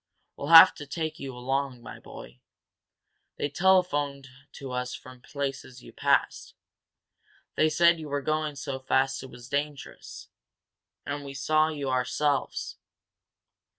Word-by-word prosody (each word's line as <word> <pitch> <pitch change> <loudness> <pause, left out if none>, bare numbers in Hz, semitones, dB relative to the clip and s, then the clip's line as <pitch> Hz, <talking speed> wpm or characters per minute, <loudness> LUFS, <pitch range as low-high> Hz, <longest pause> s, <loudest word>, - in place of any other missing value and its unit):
We'll 140 - -6
have 165 +3 +10
to 145 - -9
take 160 +2 -4
you 135 -2 -7
along, 135 0 -2
my - - -10
boy. - - -12 1.0
They 145 - -2
telephoned 145 -6 +1 0.2
to 135 -2 -8
us 125 0 -3
from 130 -1 -13
places 135 -3 -6
you - - -13
passed - - 0 1.0
they 155 - +3
said 170 +2 +4
you 155 -2 -8
were 140 0 -2
going 155 0 -1
so 135 -1 -5
fast 135 +1 0
it 130 - -9
was 120 -1 -12
dangerous. 145 +1 -5 0.8
And 145 0 -4
we 140 -1 -8
saw 155 +3 +2
you 145 -4 -3
ourselves." 135 +3 -1
140 Hz, 135 wpm, -27 LUFS, 130-155 Hz, 1.0 s, have